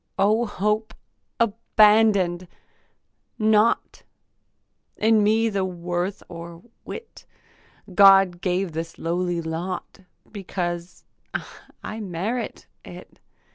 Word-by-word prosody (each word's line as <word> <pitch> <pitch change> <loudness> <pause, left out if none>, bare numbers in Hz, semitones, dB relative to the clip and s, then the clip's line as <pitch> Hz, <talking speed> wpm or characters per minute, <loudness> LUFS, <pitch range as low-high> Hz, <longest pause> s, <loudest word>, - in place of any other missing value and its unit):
O 215 +4 +2
hope 210 +2 -1 0.4
abandon'd! 210 -5 +3 0.9
Not 215 0 +2 1.0
In 220 0 +4
me 220 +2 +3
the 200 -3 -1
worth 180 +1 -3
or 170 0 -10 0.2
wit. 460 - -10 0.7
God 195 -2 +6
gave 185 -1 -1
this 165 +1 -6
lowly 175 +1 -1
lot 170 +4 -5 0.3
Because 175 -3 -5 0.8
I 220 - -6
merit 210 +5 -4 0.2
it. - - -13
195 Hz, 85 wpm, -24 LUFS, 175-215 Hz, 1.0 s, God